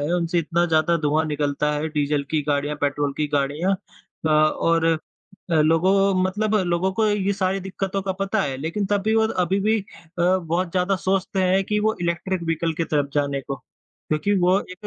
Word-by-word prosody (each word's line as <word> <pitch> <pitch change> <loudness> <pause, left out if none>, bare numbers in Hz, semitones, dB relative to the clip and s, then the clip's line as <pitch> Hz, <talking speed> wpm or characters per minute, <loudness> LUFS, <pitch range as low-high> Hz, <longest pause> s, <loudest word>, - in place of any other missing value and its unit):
हैं, 150 +4 -1
उनसे 175 0 0
इतना 170 +1 +1
ज़्यादा 165 +1 +2
धुआँ 155 0 +1
निकलता 150 -1 -1
है, 150 +1 -2
डीज़ल 150 -1 0
की 155 -2 +1
गाड़ियाँ, 145 +1 0
पेट्रोल 145 0 0
की 150 - 0
गाड़ियाँ 145 +7 +1 0.5
अ, - - +3
और 155 +2 +3 0.7
अ, - - +2
लोगों 185 +5 +3
मतलब 210 +3 0
लोगों 185 0 0
को 220 +2 +1
ये 200 -1 +1
सारी 190 0 -1
दिक्कतों 190 +1 -3
का 190 -1 -2
पता 195 - 0
है, 135 -2 -2
लेकिन 165 +8 -2
तब 205 0 +1
भी 220 +1 +1
वो 220 0 +4
अभी 185 -1 0
भी 215 +2 +2
अ, - - -12 0.4
बहुत 175 0 +1
ज़्यादा 185 +2 +1
सोचते 190 0 0
हैं 190 +1 +3
कि 210 +1 0
वो 220 +1 +1
इलेक्ट्रिक 170 +1 -2
वहिकल 165 0 -1
की 165 - -1
तरफ 145 -3 -1
जाने 140 -1 0
को 135 +1 -7 0.5
क्योंकि 155 +6 0
वो 180 +2 +4
एक 185 +3 -9
170 Hz, 195 wpm, -23 LUFS, 150-195 Hz, 0.7 s, वो